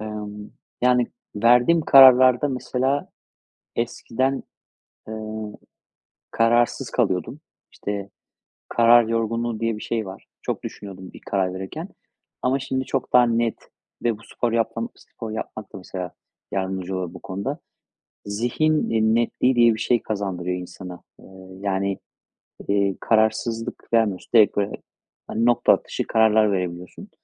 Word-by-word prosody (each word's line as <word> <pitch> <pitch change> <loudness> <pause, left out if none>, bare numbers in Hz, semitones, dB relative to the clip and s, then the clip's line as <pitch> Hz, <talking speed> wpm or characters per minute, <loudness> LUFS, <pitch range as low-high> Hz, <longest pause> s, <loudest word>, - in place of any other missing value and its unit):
Emm, 105 -1 -7 0.3
yani, 125 -1 +4 0.3
verdiğim 125 +9 +5
kararlarda 130 -1 +7
mesela 130 +1 -1 0.7
eskiden, 130 +3 -1 0.7
eee, 110 - -6 1.2
kararsız 115 +1 +2
kalıyordum. 115 +10 0 0.3
İşte, 100 -1 -5 0.6
"karar 120 0 +6
yorgunluğu" 115 0 -1
diye 115 -1 0
bir 105 - -9
şey 110 -3 -2
var. 95 - -10 0.2
Çok - - -3
düşünüyordum 95 -2 -9
bir - - -12
karar 95 -2 0
verirken. 95 0 -6 0.5
Ama 130 +2 +2
şimdi 130 0 -2
çok 135 0 -3
daha 125 -1 +6
net 115 -1 +1 0.5
ve 115 -3 +1
bu - - -17
sporu 120 -1 -2
yapmam, 115 0 -1
spor 110 -1 -9
yapmak 110 -1 -6
da - - -6
mesela 90 -1 -6 0.4
yardımcı 95 -1 -2
olur 90 -1 -4
bu 90 - -10
konuda. 100 - -4 0.7
Zihin, 120 +9 0
iii, 110 0 +2
netliği 120 +2 +2
diye 120 -1 +6
bir - - -7
şey 120 -2 +2
kazandırıyor 90 -4 -3
insana. 90 0 -9 0.2
Eee, - - -18 0.4
yani, 100 -1 -1 0.7
iii, 100 -1 +1
kararsızlık 115 +1 0
vermiyorsun. 110 -5 +1
Direkt 105 -2 +6
böyle, 100 - 0 0.6
hani, 115 +2 -1
nokta 120 -1 +5
atışı - - -3
kararlar 110 -1 +4
verebiliyorsun. 90 -2 -4
110 Hz, 130 wpm, -23 LUFS, 100-120 Hz, 1.2 s, kararlarda